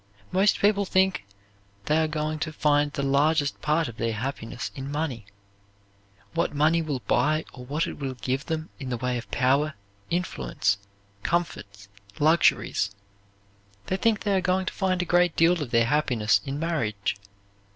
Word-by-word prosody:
Most 195 +3 +3
people 205 0 +3
think 190 - +1 0.6
they 150 - +2
are 160 - +2
going 155 0 -2
to 155 - -2
find 145 -1 +2
the 140 - -3
largest 145 +2 +2
part 155 +2 +1
of 115 - -9
their 115 0 -1
happiness 125 +1 -4
in 135 +1 -6
money, 140 -8 -3 1.1
what - - 0
money 155 +3 +3
will 145 -5 -3
buy 155 +5 +1
or 125 0 -10
what 150 +5 -1
it - - -7
will 135 -2 -3
give 130 +4 -3
them 160 0 -3
in 135 -3 -5
the 125 - -1
way 125 +1 -1
of 115 - -11
power, 140 +4 +2 0.3
influence, 100 - -1 0.4
comforts, 100 -11 -2 0.3
luxuries. 155 -9 +3 1.0
They 190 - -1
think 220 -1 +2
they 200 -2 +1
are 190 - +2
going 185 +1 +1
to - - -3
find 185 -2 0
a - - -5
great 175 0 +3
deal 170 0 +4
of 140 - -3
their 115 -1 +3
happiness 125 -6 +2
in 140 0 -3
marriage. 115 - -1
150 Hz, 165 wpm, -26 LUFS, 125-170 Hz, 1.1 s, deal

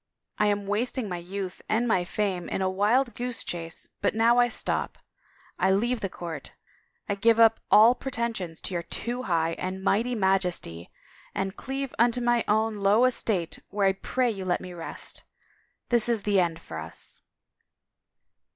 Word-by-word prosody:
I 210 - +4
am 205 -1 0
wasting 225 +4 -1
my 180 -2 -4
youth 185 +1 -6
and 230 +3 +2
my 185 -6 +2
fame 190 -2 -2
in 190 - -1
a 190 - +2
wild 230 +6 +2
goose 245 +1 -3
chase 165 -1 -5
but - - +1
now 230 +2 +4
I 245 - +5
stop. 240 - -2 0.6
I 190 - +3
leave 230 +6 +2
the 195 - -3
court, 165 -5 -7 0.5
I - - 0
give 225 +3 +3
up 225 -1 +6
all 220 +3 +8
pretensions 230 -10 -4
to - - -4
your 175 - -1
Too 240 +8 -4
High 165 -6 0
and 190 +1 -4
Mighty 230 +5 +1
Majesty 180 - 0 0.5
and 195 +1 -2
cleave 270 0 -4
unto 240 +1 +3
my 240 -1 +2
own 220 +1 +1
low 205 +5 +4
estate 210 -9 0
where 200 -1 0
I 195 - +4
pray 245 +5 0
you 195 -3 -5
let 180 -1 0
me 180 - -8
rest.... 170 -2 -5 0.7
This 240 -1 +4
is 225 -4 0
the 205 -2 +3
end 170 -2 0
for 80 - -7
us." 80 +1 -8
205 Hz, 170 wpm, -27 LUFS, 185-235 Hz, 0.7 s, all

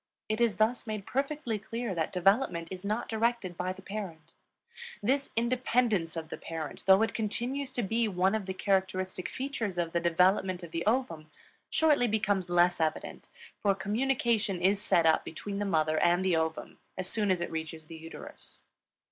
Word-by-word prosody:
It 215 +2 -1
is 230 -3 +3
thus 225 +3 +1
made 215 -2 -4
perfectly 275 -4 -2
clear 230 +1 -4
that 165 -2 -1
development 185 -2 +2
is 185 0 -6
not 210 +3 -1
directed 225 -5 0
by 180 +2 -2
the 190 0 -10
parent. 170 -6 -7 0.7
This 275 +5 +1
independence 235 -7 +1
of 160 -1 -5
the - - -5
parent, 160 +2 -6
though 190 +3 +7
it 225 - 0
continues 245 +5 -2
to 245 - -1
be 225 +3 +1
one 190 0 +2
of 215 -3 -2
the 190 - -2
characteristic 190 -1 0
features 250 -8 -3
of 170 -1 -1
the 170 - +2
development 180 +2 +2
of 170 - -8
the 165 0 -2
ovum, 170 -11 0 0.4
shortly 295 -6 +3
becomes 205 -4 0
less 175 -1 +3
evident, 155 -1 -2 0.3
for 200 -2 +3
communication 220 -1 0
is 195 +3 +2
set 170 -5 +3
up 160 -1 +4
between 200 +5 -5
the 205 - -1
mother 155 -4 +2
and 175 +2 +3
the 185 -3 +3
ovum 160 0 -2 0.2
as 185 -1 -2
soon 210 0 0
as 185 -2 +2
it 175 - -3
reaches 160 0 -5
the 165 - -10
uterus. 165 +1 -10
195 Hz, 180 wpm, -30 LUFS, 175-225 Hz, 0.7 s, though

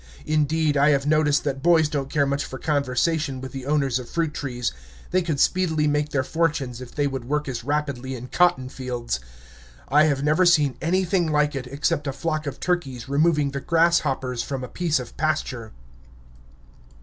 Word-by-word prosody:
Indeed, 155 0 +1
I 145 +2 +5
have 140 -2 +2
noticed 150 -1 +3
that 135 -2 -2
boys 165 -1 +4
don't 140 -3 -3
care 145 -1 +2
much 140 +1 -1
for 130 - -7
conversation 145 +1 0
with 130 0 -7
the 135 -1 -7
owners 140 -4 +1
of 125 - -9
fruit 165 -3 -1
trees. 125 -5 -3 0.4
They 185 - +3
could 160 -5 -2
speedily 160 -4 +2
make 150 0 +1
their 135 -3 0
fortunes 145 -6 -1
if 125 - -10
they 145 - +1
would 135 -3 -3
work 150 +3 -1
as 120 -3 -4
rapidly 140 -2 -2
in 125 0 -7
cotton 175 -7 +2
fields. 125 - -4 0.7
I 150 +3 +5
have 140 -3 0
never 155 +5 +3
seen 150 -6 +4
anything 180 -1 +1
like 150 0 +2
it, 135 -2 -5
except 140 +2 -1
a 135 - -1
flock 155 0 -2
of 140 - -5
turkeys 135 -10 -2
removing 150 0 +2
the 140 0 -4
grasshoppers 150 -7 +1
from 135 +1 -4
a - - -4
piece 165 0 0
of 125 -2 -9
pasture. 140 -7 -2
145 Hz, 185 wpm, -24 LUFS, 130-155 Hz, 0.7 s, I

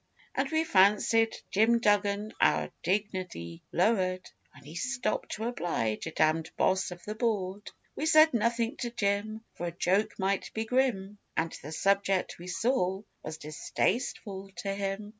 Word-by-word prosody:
And 270 0 0
we 315 +1 +2
fancied 210 -1 +4
Jim 225 +4 +4
Duggan 205 -1 +1
our - - +3
dignity 185 - -2
lower'd 185 -1 +1 0.2
When 145 - -15
he 150 +3 -11
stopped 250 +3 -2
to 215 - -4
oblige 170 - -1
a - - -4
damned 155 +1 +2
Boss 190 0 +2
of 175 -1 -10
the 210 - -3
board. 205 -3 -2 0.3
We 310 - -1
said 315 -1 +7
nothing 235 +3 +1
to 240 - -3
Jim, 215 -1 -1
For 175 - -4
a - - -3
joke 185 +5 +1
might 195 0 -1
be 220 0 -1
grim, 220 -5 0 0.2
And 165 0 +1
the 150 - -8
subject, 195 +2 +1
we 175 - -9
saw, 190 -1 0 0.2
was 155 0 -6
distasteful 190 +5 -2
to 195 -1 -1
him. 200 +1 -3
200 Hz, 155 wpm, -30 LUFS, 185-225 Hz, 0.3 s, said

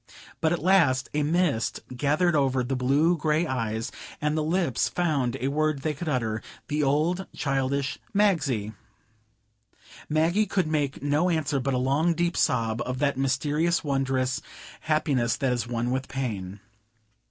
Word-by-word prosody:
But 160 - +2
at 175 - +2
last 160 -9 +3
a 150 - +1
mist 150 -6 0
gathered 150 +6 +2
over 135 -3 +2
the 135 +2 -2
blue 140 +7 +3
gray 155 +1 +1
eyes, 115 -5 -2 0.3
and 150 0 0
the 155 - +1
lips 165 -5 +1
found 145 -9 0
a 130 - -1
word 155 -1 0
they 155 - 0
could 155 +3 -5
utter,—the 125 +4 -3
old 155 +7 +1
childish 135 0 -1
"Magsie!" 155 - +1 1.4
Maggie 165 +7 +2
could 185 -2 +1
make 145 -4 -1
no 145 +5 +2
answer 150 -4 0
but 135 +1 -1
a - - +1
long, 145 +7 +2
deep 175 0 0
sob 115 0 +1
of 125 +1 -3
that 140 0 +1
mysterious, 145 +6 +1
wondrous 135 -2 0 0.4
happiness 140 -6 +1
that 135 -2 0
is 120 -2 -2
one 120 0 -1
with 130 0 -2
pain. 105 -7 -4
140 Hz, 150 wpm, -26 LUFS, 130-160 Hz, 1.4 s, last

